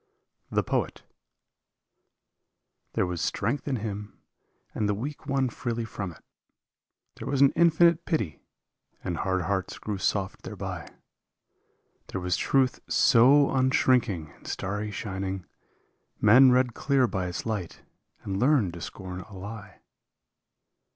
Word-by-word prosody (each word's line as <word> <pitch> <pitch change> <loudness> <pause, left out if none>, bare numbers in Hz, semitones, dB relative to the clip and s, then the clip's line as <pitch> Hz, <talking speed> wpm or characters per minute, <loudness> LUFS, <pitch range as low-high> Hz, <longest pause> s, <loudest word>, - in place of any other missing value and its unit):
147 - - -9 0.4
THE - - -18
POET - - -40 1.8
There - - +1
was 90 -2 -3
strength 115 +11 -1
in 140 - 0
him 105 -2 -5 0.6
and 105 -1 -1
the 105 - +1
weak 140 +7 -6
won 135 -1 +1
freely 120 -1 -3
from 100 -4 -5
it, 85 - -17 0.9
There - - -7
was 140 -1 0
an 140 - +7
infinite 170 0 +4
pity, 110 - -2 0.6
and 85 -3 -2
hard 95 0 0
hearts 95 +1 -2
grew 105 -3 -4
soft 95 -1 -1
thereby. - - -6 1.2
There 95 - -4
was 90 -1 0
truth 130 +5 +2
so 135 +4 +6
unshrinking 125 - +2
and - - -17
starry 105 +3 -3
shining, 95 -2 -4 0.7
Men 125 +5 +7
read 125 -1 +3
clear 135 0 +2
by 95 -5 -2
its 90 - -5
light 105 -6 -4 0.4
and 95 -1 -3
learned 125 - +3
to 85 - -8
scorn 90 0 -7
a 100 0 -12
lie. 100 0 -9
105 Hz, 130 wpm, -27 LUFS, 95-130 Hz, 1.8 s, an